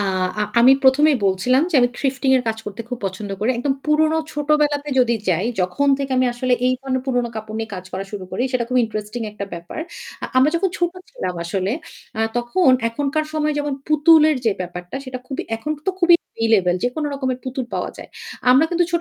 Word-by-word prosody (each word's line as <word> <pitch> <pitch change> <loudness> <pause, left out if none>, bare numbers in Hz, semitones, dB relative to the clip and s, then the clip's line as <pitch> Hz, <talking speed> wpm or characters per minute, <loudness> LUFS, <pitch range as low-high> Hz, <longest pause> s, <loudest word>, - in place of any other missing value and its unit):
আ - - +1 0.6
আমি 255 +3 +8
প্রথমেই 285 +2 +5
বলছিলাম 245 +9 +2
যে - - -5
আমি 245 - +4
থিফটিং 270 0 0
এর 255 - +1
কাজ 220 0 -2
করতে 205 +2 -6
খুব 250 - -4
পছন্দ 195 +2 -6
করি। 220 - +2
একদম 270 +3 +1
পুরনো 310 +1 +3
ছোটবেলাতে 295 0 +1
যদি 235 -2 +4
যাই, 180 +4 +1
যখন 180 +11 +1
থেকে 275 -1 -3
আমি 255 0 +3
আসলে 250 +1 -1
এই 255 - +3
ধরনের 260 -1 -2
পুরনো 245 -2 0
কাপড় 215 0 -6
নিয়ে 225 0 -4
কাজ 185 -1 -7
করা 190 +1 -3
শুরু 200 -3 -5
করি - - -1
সেটা 250 -2 +1
খুব 255 - 0
ইন্টারেস্টিং 215 +1 -5
একটা 205 -1 -5
ব্যাপার। 170 - -7 0.4
আ - - -2
আমরা 265 +4 +5
যখন 380 +3 +1
ছোট 345 0 +1 0.2
ছিলাম 180 -1 -4
আসলে 190 +4 -1 0.5
আ - - +1 0.2
তখন 240 +7 +2 0.2
এখনকার 285 +6 -1
সময় 305 -1 0
যেমন 290 0 -2 0.2
পুতুলের 310 0 +5
যে 225 - +3
ব্যাপারটা 180 +1 -6
সেটা 260 -1 -6
খুবই 270 +1 -4
এখন 225 +7 -5 0.2
তো - - +4
খুবই 345 -1 +7
এভেইলেবল 215 -6 +1
যেকোনো 275 +5 -1
রকমের 260 -2 -2
পুতুল 260 0 -3
পাওয়া - - -2
যায়। - - -10 0.4
আমরা 265 +5 +6
কিন্তু 350 0 +2
ছোট 340 - +1
255 Hz, 200 wpm, -21 LUFS, 215-295 Hz, 0.6 s, আমি